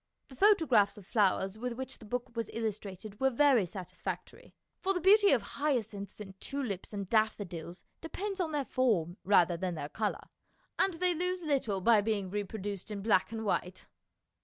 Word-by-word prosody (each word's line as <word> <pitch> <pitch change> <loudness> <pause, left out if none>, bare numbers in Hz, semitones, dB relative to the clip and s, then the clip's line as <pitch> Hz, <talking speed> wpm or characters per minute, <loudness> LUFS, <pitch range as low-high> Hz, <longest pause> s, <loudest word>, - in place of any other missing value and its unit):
The 265 - -12
photographs 290 - +4
of 200 - -12
flowers 195 -1 +1
with 250 +1 -3
which 260 +2 -7
the 220 - -12
book 245 +2 -4
was 230 0 -2
illustrated 210 -2 -5
were 265 - +4
very 260 -6 +4
satisfactory, 185 -1 -7 0.2
for 390 +1 0
the - - +1
beauty 405 +3 +6
of 240 -6 +3
hyacinths 225 -9 -2
and 190 -2 -10
tulips 250 -10 -3
and 200 -2 -4
daffo 220 -1 +2
dils 170 0 -8 0.2
depends 385 +4 -4
on 325 -3 -1
their 290 -2 -1
form 200 -11 +1
rather 175 -3 +4
than 180 0 -2
their 145 -2 -5
colour, 215 +3 -3 0.5
and 380 -3 +2
they 360 +1 +2
lose 360 +2 -2
little 260 -10 0
by 225 +1 +5
being 205 -3 -1
repro 205 +1 -3
duced 200 -1 -5
in 200 -2 -5
black 210 -2 +3
and 225 -1 -4
white. 185 -2 -2
220 Hz, 180 wpm, -31 LUFS, 195-275 Hz, 0.5 s, beauty